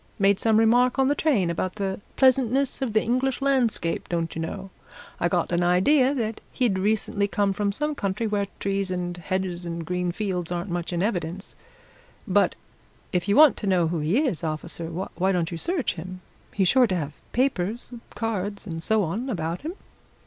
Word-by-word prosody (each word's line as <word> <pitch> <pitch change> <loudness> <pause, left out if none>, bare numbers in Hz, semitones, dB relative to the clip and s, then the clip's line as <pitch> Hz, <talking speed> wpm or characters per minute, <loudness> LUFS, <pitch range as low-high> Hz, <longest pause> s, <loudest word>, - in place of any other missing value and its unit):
Made 200 -2 +3
some 220 -1 +3
remark 245 +3 +4
in 265 0 +3
the - - +4
train 250 - +1
about 185 +2 -2
the 195 -1 -3
pleasantness 265 0 +3
of 250 -5 -1
the 215 - +3
English 255 +2 0
landscape, 250 -11 0
don't 165 -2 -2
you 165 - -3
know? 190 +3 -5 0.5
I 175 - +2
got 175 -1 0
an 175 0 +2
idea 255 +11 +4
that 225 -4 -2
he'd 230 -8 +1
recently 205 0 +1
come 200 -1 +1
from 205 +1 0
some 300 +8 -1
country 200 -3 -2
where 205 -2 0
trees 195 -1 -1
and 180 -1 -3
hedges 180 0 -3
and 170 -1 -5
green 180 +1 -1
fields 180 -3 -3
aren't 175 +2 -3
much 175 0 -2
in 175 +1 0
evidence. 180 -3 -2 0.7
But - - +3 0.6
if 180 +1 0
you 200 - +3
want 305 -2 +7
to 210 - -4
know 180 -4 +3
who 170 -1 -1
he 155 +9 +1
is, 180 - -1
officer, 165 +1 -4
why 185 +2 -2
don't 175 -2 0
you 170 - -4
search 345 - 0
him? 185 +2 -8 0.3
He's 195 -2 +1
sure 260 -2 +5
to 190 - -1
have 150 -4 -5
papers, 240 -3 0 0.2
cards, 205 -3 -3
and 165 -4 -5
so 220 +4 +2
on 210 +11 -3
about 170 -5 -2
him." 320 +4 -4
195 Hz, 190 wpm, -25 LUFS, 175-230 Hz, 0.7 s, want